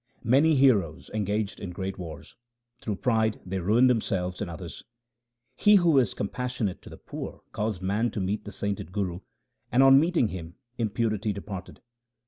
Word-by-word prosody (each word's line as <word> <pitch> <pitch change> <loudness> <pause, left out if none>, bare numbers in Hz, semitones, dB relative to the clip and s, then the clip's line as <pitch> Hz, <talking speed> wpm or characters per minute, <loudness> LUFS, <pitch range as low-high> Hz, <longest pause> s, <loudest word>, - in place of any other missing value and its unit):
Many 145 +7 +4
heroes 100 - +2
engaged 105 0 -1
in 100 - -5
great 95 +2 -5
wars; 80 -4 -9 0.5
through 105 - -2
pride 110 -1 +1
they 95 +1 -3
ruined 110 +8 +4
themselves 95 -7 0
and - - -3
others. 85 0 -8 0.7
He 210 0 +5
who 170 -7 +5
is 120 -6 +1
compassionate 120 -2 -3
to - - -12
the - - -11
poor - - -8
caused 105 -3 -3
man 105 +5 +1
to 110 - -5
meet 100 +2 -2
the 105 - -8
sainted 100 -3 -4
Guru, 95 -3 -2 0.5
and 130 +3 +5
on 135 0 +8
meeting 160 -7 +2
him 85 -2 -7 0.2
impurity 110 -1 0
departed. 100 -2 -8
105 Hz, 160 wpm, -27 LUFS, 95-120 Hz, 0.7 s, on